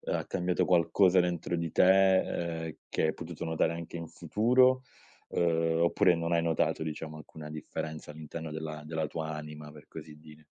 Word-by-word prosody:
uhm, -, -, -3 dB
ha -, -, -1 dB
cambiato 90 Hz, -1 st, 0 dB
qualcosa 90 Hz, +1 st, +4 dB
dentro 85 Hz, -1 st, -1 dB
di 85 Hz, -1 st, -2 dB
te, 90 Hz, -3 st, +3 dB
uhm, -, -, -24 dB
che -, -, -1 dB
hai -, -, +1 dB
potuto 85 Hz, -1 st, -7 dB
notare 80 Hz, 0 st, 0 dB
anche 85 Hz, 0 st, -6 dB
in 85 Hz, -1 st, -7 dB
futuro? 125 Hz, +10 st, +3 dB, 0.5 s
Uhm, 80 Hz, -1 st, +1 dB
oppure 90 Hz, +1 st, +4 dB
non 85 Hz, +1 st, -2 dB
hai 85 Hz, -, +4 dB
notato, 80 Hz, -1 st, +1 dB
diciamo, 80 Hz, 0 st, -5 dB
alcuna 75 Hz, 0 st, -10 dB
differenza 75 Hz, 0 st, -6 dB
all'interno 80 Hz, +1 st, -7 dB
della 75 Hz, -1 st, -5 dB
della 80 Hz, 0 st, -2 dB
tua 80 Hz, 0 st, -4 dB
anima, 75 Hz, 0 st, -8 dB
per 75 Hz, -1 st, -14 dB
così 75 Hz, -1 st, -10 dB
dire. 75 Hz, 0 st, -16 dB
80 Hz, 175 wpm, -30 LUFS, 80-85 Hz, 0.5 s, qualcosa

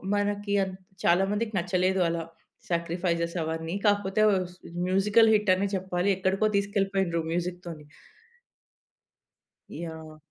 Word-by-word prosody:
మనకి 205 Hz, 0 st, -1 dB
అం 190 Hz, -, -4 dB, 0.3 s
చాలా 175 Hz, +3 st, +4 dB
మందికి 215 Hz, +1 st, -2 dB
నచ్చలేదు 185 Hz, +2 st, +1 dB
అలా 165 Hz, 0 st, -2 dB, 0.5 s
సాక్రిఫైస్స్ 170 Hz, 0 st, -1 dB
అవన్నీ. 160 Hz, +1 st, -3 dB
కాకపోతే 205 Hz, 0 st, +2 dB, 0.3 s
స్ -, -, -18 dB, 0.3 s
మ్యూజికల్ 205 Hz, +4 st, +4 dB
హిట్ 210 Hz, -2 st, +2 dB
అనే 195 Hz, +2 st, 0 dB
చెప్పాలి. 185 Hz, 0 st, -1 dB
ఎక్కడికో 190 Hz, +3 st, +1 dB
తీసుకెళ్ళిపోయిండ్రు 195 Hz, -3 st, 0 dB
మ్యూజిక్‌తోని. 175 Hz, -3 st, -4 dB, 2.0 s
యాహ్! 160 Hz, -1 st, -8 dB
185 Hz, 105 wpm, -27 LUFS, 170-200 Hz, 2.0 s, చాలా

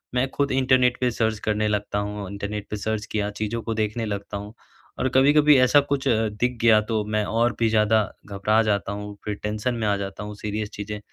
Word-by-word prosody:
मैं 125 Hz, +2 st, +2 dB
खुद 140 Hz, 0 st, 0 dB
इंटरनेट 130 Hz, -1 st, +3 dB
पे 125 Hz, -1 st, +2 dB
सर्च 110 Hz, -2 st, -1 dB
करने 105 Hz, 0 st, +1 dB
लगता 105 Hz, -1 st, -1 dB
हूँ। 105 Hz, -1 st, -4 dB
इंटरनेट 100 Hz, 0 st, -5 dB
पे 105 Hz, -, -3 dB
सर्च 110 Hz, 0 st, -2 dB
किया 105 Hz, -1 st, -1 dB
चीज़ों 110 Hz, +2 st, -2 dB
को 115 Hz, -, -2 dB
देखने 110 Hz, +1 st, -1 dB
लगता 100 Hz, -1 st, -4 dB
हूँ। 105 Hz, +1 st, -8 dB, 0.5 s
और 130 Hz, -, +1 dB
कभी-कभी 145 Hz, +2 st, +6 dB
ऐसा 130 Hz, +3 st, +6 dB
कुछ 140 Hz, -1 st, 0 dB
दिख 115 Hz, +1 st, 0 dB
गया 110 Hz, -2 st, +6 dB
तो 110 Hz, -1 st, +1 dB
मैं 105 Hz, 0 st, 0 dB
और 115 Hz, +3 st, +1 dB
भी 115 Hz, -1 st, +3 dB
ज़्यादा 110 Hz, 0 st, +3 dB, 0.2 s
घबरा 105 Hz, +2 st, +1 dB
जाता 100 Hz, -3 st, 0 dB
हूँ, 105 Hz, 0 st, -6 dB
फिर 105 Hz, -, -2 dB
टेंशन 110 Hz, +4 st, -1 dB
में 110 Hz, -2 st, -1 dB
आ 100 Hz, -, +2 dB
जाता 100 Hz, +1 st, -6 dB
हूँ, 105 Hz, 0 st, -7 dB
सीरियस 105 Hz, 0 st, -4 dB
चीज़ें, 105 Hz, 0 st, -5 dB
110 Hz, 210 wpm, -24 LUFS, 105-120 Hz, 0.5 s, कभी-कभी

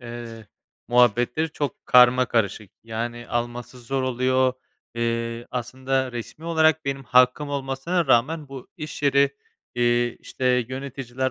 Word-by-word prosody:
eee, 120 Hz, -2 st, -9 dB, 0.4 s
muhabbetleri 125 Hz, +6 st, +3 dB
çok 145 Hz, -3 st, -4 dB
karmakarışık. 120 Hz, -5 st, +4 dB
Yani, 120 Hz, +1 st, -5 dB
alması 120 Hz, +1 st, -4 dB
zor 130 Hz, +2 st, -2 dB
oluyor. 130 Hz, 0 st, +1 dB, 0.4 s
Eee, 115 Hz, 0 st, -2 dB
aslında 130 Hz, +1 st, -2 dB
resmî 120 Hz, +6 st, -8 dB
olarak 160 Hz, -2 st, +3 dB
benim 135 Hz, -1 st, -3 dB
hakkım 125 Hz, +4 st, +3 dB
olmasına 140 Hz, +5 st, -1 dB
rağmen 135 Hz, +4 st, +2 dB
bu 135 Hz, -2 st, -9 dB
iş 155 Hz, -3 st, -7 dB
yeri, 140 Hz, 0 st, +4 dB, 0.4 s
eee, 120 Hz, 0 st, +1 dB
işte, 125 Hz, -1 st, 0 dB
yöneticiler 130 Hz, -1 st, -4 dB
125 Hz, 115 wpm, -24 LUFS, 120-135 Hz, 0.4 s, karmakarışık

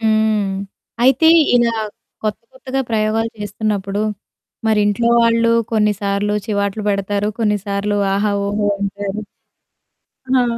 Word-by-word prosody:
హ్మ్. 215 Hz, -2 st, +2 dB, 0.5 s
అయితే 270 Hz, +5 st, +4 dB, 0.3 s
ఇలా 235 Hz, -1 st, +2 dB, 0.5 s
కొత్త, 215 Hz, -1 st, -2 dB
కొత్తగా 260 Hz, +1 st, -3 dB
ప్రయోగాలు 220 Hz, +1 st, 0 dB
చేస్తున్నప్పుడు 205 Hz, -1 st, -2 dB, 0.7 s
మరి 215 Hz, -1 st, +3 dB
ఇంట్లో 220 Hz, +3 st, +1 dB
వాళ్ళు 230 Hz, 0 st, +3 dB, 0.2 s
కొన్నిసార్లు 205 Hz, -1 st, +1 dB
చివాట్లు 200 Hz, 0 st, -1 dB
పెడతారు, 200 Hz, +1 st, 0 dB
కొన్నిసార్లు 205 Hz, -1 st, 0 dB, 0.2 s
"ఆహా! 205 Hz, +1 st, +1 dB
ఓహో!" 205 Hz, 0 st, 0 dB
ఉంటారు. 200 Hz, +1 st, -3 dB, 1.2 s
ఆ! -, -, +4 dB
210 Hz, 100 wpm, -18 LUFS, 200-220 Hz, 1.2 s, అయితే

